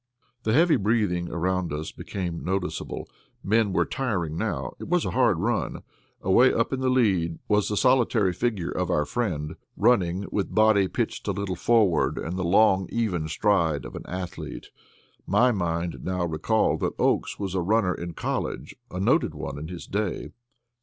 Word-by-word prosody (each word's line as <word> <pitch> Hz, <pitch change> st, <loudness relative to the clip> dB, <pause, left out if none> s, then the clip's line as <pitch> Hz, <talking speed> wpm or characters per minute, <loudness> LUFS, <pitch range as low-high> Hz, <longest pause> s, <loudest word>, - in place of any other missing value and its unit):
The 110 Hz, -, 0 dB
heavy 165 Hz, +4 st, +5 dB
breathing 100 Hz, -5 st, 0 dB
around 90 Hz, 0 st, -1 dB
us 75 Hz, +1 st, -4 dB
became 90 Hz, -4 st, -5 dB
noticeable; 95 Hz, 0 st, -3 dB, 0.4 s
men 105 Hz, +1 st, +2 dB
were -, -, +2 dB
tiring 100 Hz, -, -2 dB
now. -, -, -2 dB
It -, -, -7 dB
was 175 Hz, -1 st, +1 dB
a -, -, -1 dB
hard 120 Hz, -8 st, +3 dB
run. 110 Hz, +6 st, -1 dB, 0.4 s
Away 120 Hz, +8 st, +5 dB
up 115 Hz, +3 st, 0 dB
in 135 Hz, -, -1 dB
the 130 Hz, 0 st, +1 dB
lead 95 Hz, -10 st, +2 dB
was 105 Hz, -1 st, +2 dB
the 105 Hz, -, -1 dB
solitary 120 Hz, -7 st, +3 dB
figure 105 Hz, -6 st, -1 dB
of 90 Hz, -1 st, -2 dB
our 75 Hz, -4 st, +1 dB
friend, 80 Hz, -7 st, -2 dB, 0.2 s
running 100 Hz, -5 st, +2 dB
with 100 Hz, -, -2 dB
body 110 Hz, -3 st, +5 dB
pitched -, -, -3 dB
a -, -, +2 dB
little 95 Hz, -1 st, -3 dB
forward 100 Hz, -4 st, +2 dB
and 85 Hz, +3 st, -4 dB
the 95 Hz, -, -2 dB
long, 95 Hz, +1 st, +4 dB
even 95 Hz, -9 st, -1 dB
stride 80 Hz, -, +1 dB
of -, -, -8 dB
the -, -, -6 dB
athlete. 90 Hz, -4 st, -6 dB, 0.6 s
My 125 Hz, 0 st, +4 dB
mind 85 Hz, -4 st, -2 dB
now 90 Hz, -1 st, -1 dB
recalled 85 Hz, +7 st, +1 dB
that -, -, -1 dB
Oakes -, -, +1 dB
was 95 Hz, -2 st, -4 dB
a 95 Hz, -, 0 dB
runner 95 Hz, 0 st, +2 dB
in 85 Hz, -1 st, -6 dB
college 70 Hz, +5 st, -3 dB
a 90 Hz, -, -5 dB
noted 95 Hz, -, +2 dB
one 70 Hz, +1 st, -5 dB
in 75 Hz, -, -6 dB
his 90 Hz, 0 st, -7 dB
day. 100 Hz, -1 st, -3 dB
95 Hz, 175 wpm, -26 LUFS, 85-110 Hz, 0.6 s, heavy